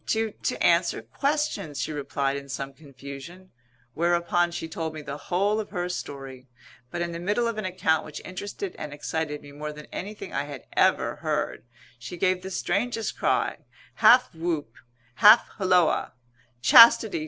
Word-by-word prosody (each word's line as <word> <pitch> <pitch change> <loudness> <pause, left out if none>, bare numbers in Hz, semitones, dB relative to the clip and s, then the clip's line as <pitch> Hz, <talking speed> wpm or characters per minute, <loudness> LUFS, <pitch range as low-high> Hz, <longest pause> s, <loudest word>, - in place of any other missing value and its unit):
"To 220 -1 0
to - - -3
answer 170 -8 +2
questions," 205 - -2
she - - -2
replied 140 -1 -2
in 140 0 -7
some 135 0 -5
confusion. 140 +6 -11 0.4
Whereupon 170 +1 +1
she 170 -1 -5
told 160 -1 -5
me 155 - -7
the 140 -1 -6
whole 200 +4 +1
of 215 - -5
her 175 -2 -3
story. 135 -6 -7 0.4
But 175 +6 -3
in 170 - -4
the 170 - -5
middle 205 +7 0
of 230 -2 -3
an 215 - -4
account 180 -4 +1
which 150 -1 -8
interested 205 - -6
and 150 -1 -6
excited 150 0 -4
me 145 - -12
more 150 +1 -6
than 150 0 -11
anything 205 +3 -7
I 145 - -1
had 145 -3 -9
ever - - +2
heard, - - -3 0.3
she 130 +9 -8
gave 185 +1 +1
the 190 - -7
strangest 215 +5 -2
cry, - - 0 0.4
half - - +6
whoop, 160 -7 -3 0.4
half 210 +3 +7
holloa 180 -4 +2 0.5
"Chastity! 225 - +8
170 Hz, 165 wpm, -26 LUFS, 145-190 Hz, 0.5 s, Chastity